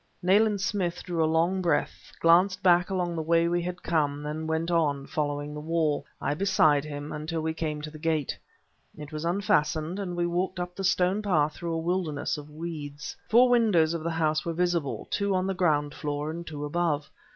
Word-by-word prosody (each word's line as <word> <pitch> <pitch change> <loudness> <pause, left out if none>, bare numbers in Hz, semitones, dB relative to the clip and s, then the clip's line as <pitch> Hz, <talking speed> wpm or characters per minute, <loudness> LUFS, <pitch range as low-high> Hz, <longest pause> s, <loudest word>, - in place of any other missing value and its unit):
Nayland 205 +3 +4
Smith 185 -2 -1
drew 170 -3 0
a 155 - +2
long 170 +4 +2
breath, 175 -2 -1
glanced 185 +3 +4
back 175 0 +4
along 180 -3 -1
the 160 - -1
way 165 +1 +3
we 175 +1 +1
had 180 +1 -5
come, 145 -3 0
then 155 +2 -4
went 160 +2 -1
on, 145 -5 +1
following 145 0 -2
the 150 - -6
wall, 155 -1 0 0.2
I 145 - -1
beside 155 -5 +3
him, 145 -1 -6
until 155 +2 -3
we 160 0 -1
came 155 -2 -3
to 155 - -6
the 155 - -11
gate. 155 -3 0 0.6
It 150 0 -9
was 155 +1 -4
unfastened, 170 -1 +1
and 180 -3 -4
we 175 0 0
walked 180 +2 -1
up 180 0 -4
the 195 - -5
stone 185 +2 +2
path 155 -7 +2
through 170 +1 -4
a - - -1
wilderness 165 -3 -1
of 150 0 -9
weeds. 150 -2 -6
Four 245 +3 +6
windows 210 -10 +3
of 165 - -3
the 170 - -1
house 155 -2 0
were 170 - -2
visible, 170 -4 -1
two 200 -1 +1
on 185 0 +1
the 195 - 0
ground 150 -5 +1
floor 150 0 -3
and 170 +1 -7
two 150 -1 -5
above. 150 -1 -1
165 Hz, 205 wpm, -27 LUFS, 150-180 Hz, 0.6 s, Four